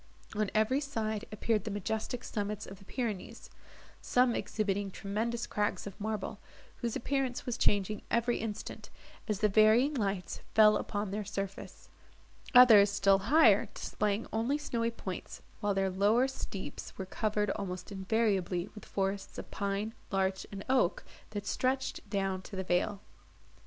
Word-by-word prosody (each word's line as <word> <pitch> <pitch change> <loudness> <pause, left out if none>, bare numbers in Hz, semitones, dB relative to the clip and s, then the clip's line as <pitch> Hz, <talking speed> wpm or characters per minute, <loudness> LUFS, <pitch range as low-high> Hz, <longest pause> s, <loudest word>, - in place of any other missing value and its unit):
On 210 -1 +1
every 220 +6 +3
side 220 -6 -2
appeared 215 -1 0
the 215 - -4
majestic 220 +4 -3
summits 210 -1 -3
of 195 0 -10
the 195 - -16
Pyrenees, 220 -4 -4 0.5
some 250 -1 +3
exhibiting 205 -3 -1
tremendous 220 +5 -2
crags 210 0 -1
of 200 +1 -9
marble, 215 -1 -3 0.4
whose 235 -3 -2
appearance 265 -1 -1
was 245 - -1
changing 205 +1 +1
every 235 +1 +2
instant, 215 -1 -5 0.4
as 210 -2 -1
the 210 - +5
varying 220 +7 +5
lights 200 -7 -2 0.2
fell 215 -1 +7
upon 205 -1 -2
their 210 +1 -2
surface; 195 0 -6 0.7
others, 220 -5 +9
still 195 -1 +4
higher, 240 -10 +6
displaying 210 +1 -1
only 235 +6 +1
snowy 235 -6 -1
points, 190 -5 -7 0.2
while 205 -2 0
their 195 -1 +1
lower 210 +7 +3
steeps 195 - -6
were 190 - -4
covered 210 +1 0
almost 185 -2 -5
invariably 195 -2 0
with 210 - -11
forests 195 0 -2
of - - -7
pine, 200 +2 -2 0.2
larch, 190 -1 0
and 195 -1 -7
oak, 255 -9 +2 0.3
that 205 -1 -5
stretched 260 -1 -1
down 195 -2 -1
to 195 - -9
the 190 - -2
vale. 190 +3 0
210 Hz, 145 wpm, -32 LUFS, 195-230 Hz, 0.7 s, others